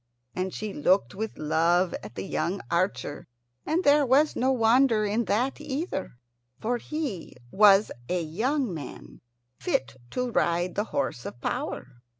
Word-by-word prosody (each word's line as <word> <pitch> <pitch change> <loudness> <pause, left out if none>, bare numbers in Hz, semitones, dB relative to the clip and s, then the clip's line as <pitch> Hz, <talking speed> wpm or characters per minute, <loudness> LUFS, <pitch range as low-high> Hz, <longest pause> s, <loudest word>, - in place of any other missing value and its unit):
And 185 +1 -2
she 210 +1 -5
looked 185 +8 +2
with 220 +2 -5
love 170 +4 +2
at 105 +3 -10
the 95 - -4
young 170 - -1
archer; 170 -4 -1 0.4
and 330 +4 +1
there 290 +1 +5
was 280 +4 +3
no 260 +2 +2
wonder 230 -2 +4
in 215 +3 0
that 250 +9 0
either, 295 - -3 0.5
for 240 +2 0
he 280 - -5 0.2
was 205 0 +6 0.2
a 180 - +1
young 225 - -1
man 145 -5 -9 0.4
fit 130 -1 -1
to 250 -1 -2
ride 175 -2 +1
the 205 - -1
horse 230 - -2
of 120 - -9
power. 120 0 -4
205 Hz, 150 wpm, -27 LUFS, 170-255 Hz, 0.5 s, was